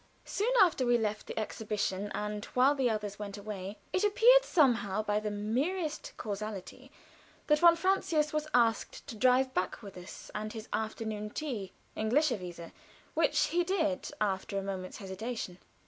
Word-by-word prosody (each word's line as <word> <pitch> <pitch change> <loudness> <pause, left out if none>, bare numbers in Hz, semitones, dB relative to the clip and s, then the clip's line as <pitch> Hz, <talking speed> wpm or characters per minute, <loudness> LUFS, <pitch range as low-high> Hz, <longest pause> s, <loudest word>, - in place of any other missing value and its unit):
Soon 425 +5 0
afterward 305 - +4
we - - +5
left 215 -2 -2
the - - -7
exhibition, 205 -2 -2
and 210 0 -3
while 260 +3 +5
the 265 -4 +1
others 210 -2 -3
went 205 -1 -5
away 200 -1 -6 0.2
it 370 - +1
appeared 475 +5 +6
somehow 235 - +2
by 210 0 +1
the 215 0 -3
merest 275 - -2
casualty 215 +4 -6 0.5
that 300 0 +4
von 340 0 +7
Francius 335 -4 +1
was 305 0 -1
asked 230 -3 +1
to 230 - -7
drive 255 +3 +3
back 185 +2 -2
with 200 -2 -9
us 180 +1 -10
and 215 0 -4
have 220 -2 -7
afternoon 215 -1 -3
tea, 220 -8 -4 0.2
englischerweise 215 - 0 0.4
which - - +2
he 350 +1 +2
did, 320 -7 0
after 195 -1 -1
a 195 - -1
moment's 190 -2 -5
hesitation. 195 -1 -5
220 Hz, 155 wpm, -31 LUFS, 205-295 Hz, 0.5 s, von